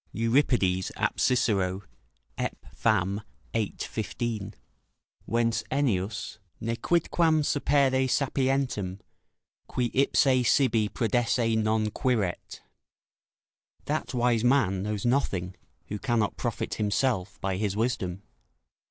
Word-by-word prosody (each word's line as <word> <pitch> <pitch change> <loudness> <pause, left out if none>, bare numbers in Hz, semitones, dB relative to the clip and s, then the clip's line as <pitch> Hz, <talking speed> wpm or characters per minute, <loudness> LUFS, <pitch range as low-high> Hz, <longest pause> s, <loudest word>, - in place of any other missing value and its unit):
Euripides, 115 -6 +2
ap. - - -1
Cicero, 100 -6 +1 0.5
Ep. - - -2 0.2
Fam., 95 +4 +1 0.3
xiii. 110 -3 -1
15.] 110 -2 -4 0.7
Whence 115 0 +1
Ennius: 110 -6 -1 0.2
"Nequidquam 155 +6 +1
sapere 135 -3 +2
sapientem, 130 -8 0 0.7
qui 120 -2 -1
ipse 130 -2 +3
sibi 115 -6 +3
prodesse 115 0 +1
non 110 0 +1
quiret." 110 -9 -1 1.2
["That - - -2
wise 120 -2 +2
man 120 -8 +3
knows 105 +1 -3
nothing, 95 -8 0 0.4
who 105 - -4
cannot 120 -4 0
profit - - -3
himself 105 -2 0
by 95 -1 -2
his 100 -1 -1
wisdom." 100 -5 -1
115 Hz, 95 wpm, -27 LUFS, 100-130 Hz, 1.2 s, ipse